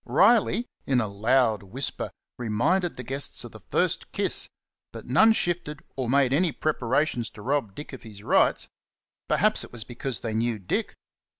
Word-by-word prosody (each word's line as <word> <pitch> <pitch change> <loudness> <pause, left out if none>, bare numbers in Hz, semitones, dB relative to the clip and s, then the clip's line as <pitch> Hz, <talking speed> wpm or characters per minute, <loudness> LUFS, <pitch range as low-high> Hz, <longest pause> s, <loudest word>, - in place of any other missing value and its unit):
Riley, 215 - +4 0.2
in 130 -2 +3
a 115 - +1
loud 110 +1 +2
whisper, 110 +8 -4 0.3
reminded 145 - +1
the 125 - -7
guests 135 +3 -2
of - - -9
the - - -11
"fust - - 0
kiss," - - +2 0.4
but - - -9
none 220 - +6
shifted 175 -8 -1
or 130 -3 -2
made 135 -1 +3
any 165 +3 +3
preparations 130 -4 0
to 105 - -12
rob 130 -7 -1
Dick 145 - -8
of 130 - -8
his 105 -3 -11
rights. - - +3 0.6
Perhaps - - +3
it - - -11
was 120 -2 -6
because 120 +1 -5
they 115 -2 -3
knew 115 +1 0
Dick. 95 -3 -2
130 Hz, 170 wpm, -26 LUFS, 115-150 Hz, 0.6 s, none